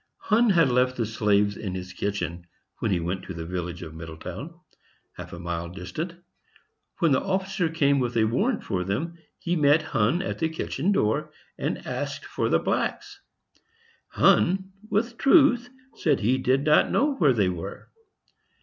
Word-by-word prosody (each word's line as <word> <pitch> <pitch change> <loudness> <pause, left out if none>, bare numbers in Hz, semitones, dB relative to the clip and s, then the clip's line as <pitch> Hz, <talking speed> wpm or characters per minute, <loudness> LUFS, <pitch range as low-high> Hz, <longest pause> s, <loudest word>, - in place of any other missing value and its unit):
Hunn 230 +2 +2
had 165 -9 +4
left 125 +1 +2
the 115 - 0
slaves 105 -2 +1
in 95 -4 -5
his 90 0 -6
kitchen 90 -4 -3 0.3
when 110 - -1
he 95 -3 +1
went 90 +3 -3
to 95 - -7
the 80 -1 -5
village 90 0 -4
of 80 -1 -9
Middletown, 85 - -8 0.5
half - - -9
a - - -7
mile 85 0 -4
distant. 95 - -6 0.8
When 165 -5 +2
the 130 - +3
officer 190 -2 -1
came 140 -4 +2
with 120 -2 -1
a 110 - +4
warrant 200 - 0
for 90 -2 -2
them, 160 - -3 0.2
he 175 +1 -2
met 150 0 +4
Hunn 135 - +1
at - - -4
the 160 - +1
kitchen 165 +4 -2
door, 150 - +1 0.2
and - - -3
asked - - -4
for - - -2
the - - +4
blacks; - - -2 0.9
Hunn, 190 +2 +3 0.2
with 230 +3 -1
truth, 275 -5 +5 0.2
said - - +1
he 125 +5 +2
did 130 +2 +2
not 150 0 +4
know 290 +1 +2
where 145 -7 +4
they 100 -5 +2
were. 90 +2 -7
130 Hz, 170 wpm, -26 LUFS, -, 0.9 s, truth